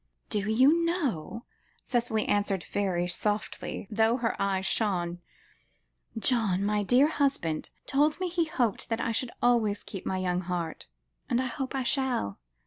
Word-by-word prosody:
"Do 210 -2 -1
you 275 +9 +5
know," 260 - -2 0.4
Cicely 235 -3 0
answered 200 -3 +1
very 185 -3 -1
softly, 205 +2 -2
though 225 +2 +3
her 235 -3 -1
eyes 195 -1 0
shone, 180 -5 0 1.0
"John, 215 -4 +2
my 210 0 +1
dear 245 +7 +5
husband, 275 - 0 0.2
told 295 +3 +2
me 370 - 0
he 345 -1 0
hoped 245 -9 -1
I 230 +1 0
should 235 +2 -1
always 225 -4 +2
keep 195 - -7
my 190 - 0
young 180 -1 0
heart, 175 -2 -4 0.4
and 240 - +2
I 260 - 0
hope 260 +2 -4
I 265 - 0
shall. 250 - 0
220 Hz, 145 wpm, -28 LUFS, 190-260 Hz, 1.0 s, you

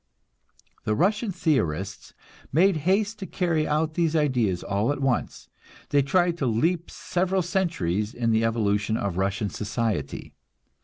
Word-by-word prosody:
The 110 - 0
Russian 210 - +1
theorists 100 - -1 0.4
made 180 +4 +4
haste 210 +2 +1
to 190 - -5
carry 165 -4 0
out 155 +1 0
these 165 -1 +1
ideas 125 - +1
all 100 +6 0
at 145 - -3
once; 135 -3 -1 0.4
they 145 -1 +4
tried 175 +5 +1
to 135 - +1
leap 165 +10 +1
several 185 +1 -1
centuries 155 - -1
in 120 -2 0
the 110 0 +2
evolution 110 -1 +1
of 95 -3 -2
Russian 95 +1 -1
society. 105 - -3
140 Hz, 140 wpm, -25 LUFS, 105-175 Hz, 0.4 s, made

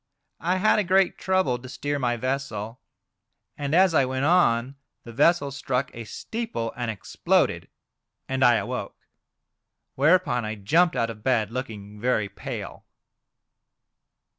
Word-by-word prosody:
I 175 +4 0
had 215 +3 +3
a - - +2
great 190 0 +2
trouble 185 -10 +1
to 130 +1 -11
steer 145 +2 -3
my 120 -2 0
vessel. 125 -3 -3 0.8
And 145 +1 -2
as 185 -1 +5
I 140 - +4
went 130 +1 -1
on 135 -7 +3 0.3
the 115 - -10
vessel 145 +2 +3
struck 135 -1 -2
a 115 -1 -7
steeple, 220 - -4
and 120 -1 -3
exploded, 110 -4 0 0.6
and 130 0 0
I 120 -2 +6
awoke. - - -4 1.0
Whereupon 145 -4 +3
I 110 0 -3
jumped 160 - +2
out 115 0 0
of 105 -1 -12
bed, 115 -5 +1
looking 105 -5 -6
very 110 -4 +1
pale." 100 - -7
130 Hz, 140 wpm, -25 LUFS, 115-165 Hz, 1.0 s, I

